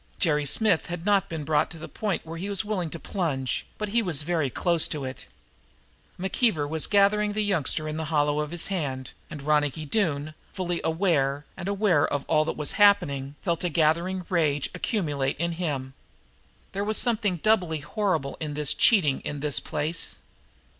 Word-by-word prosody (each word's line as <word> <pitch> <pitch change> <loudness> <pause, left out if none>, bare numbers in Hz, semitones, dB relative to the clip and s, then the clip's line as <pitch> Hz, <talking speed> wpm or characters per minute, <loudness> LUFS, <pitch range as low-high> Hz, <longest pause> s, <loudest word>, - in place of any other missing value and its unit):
Jerry 150 -4 +1
Smith 205 +2 +2
had 175 0 -6
not 200 -1 +2
been 160 -3 -4
brought 150 +1 +1
to - - -8
the 160 - -8
point 205 -6 -3
where 165 +1 -7
he 195 +3 -4
was 200 +1 -1
willing 190 -6 -2
to 165 - -6
plunge, 150 - -2
but 210 -1 -3
he 235 +3 +2
was 165 -8 +1
very 160 -3 0
close 170 +5 +2
to 145 -3 -4
it. 130 0 -7 0.9
McKeever 190 - +1
was 160 +1 -1
gathering 205 +1 +3
the 215 0 0
youngster 160 -5 +1
in 155 0 -4
the 160 - -3
hollow 150 -1 +1
of 150 -1 -2
his 175 +1 +1
hand, 135 -9 -3 0.2
and 150 -3 -8
Ronicky 150 0 +1
Doone, 155 -4 -1 0.2
fully 175 -3 -2
awake 160 -4 +1
and 180 0 -6
aware 200 -7 +2
of 140 -1 -3
all 155 0 +3
that - - -3
was 150 - 0
happening, 145 -9 +3
felt 170 -2 -1
a 180 - +1
gathering 170 +4 +1
rage 150 -6 0
accumulate 150 - -1
in 170 +3 -1
him. 145 -6 -3 0.8
There 200 - -2
was 215 +1 0
something 215 -6 +2
doubly 175 -5 +1
horrible 160 -5 -1
in 150 -2 -4
this 150 -1 +1
cheating 160 - +4
in 145 - -5
this 150 -2 +2
place. 155 +3 -1
165 Hz, 180 wpm, -26 LUFS, 145-190 Hz, 0.9 s, cheating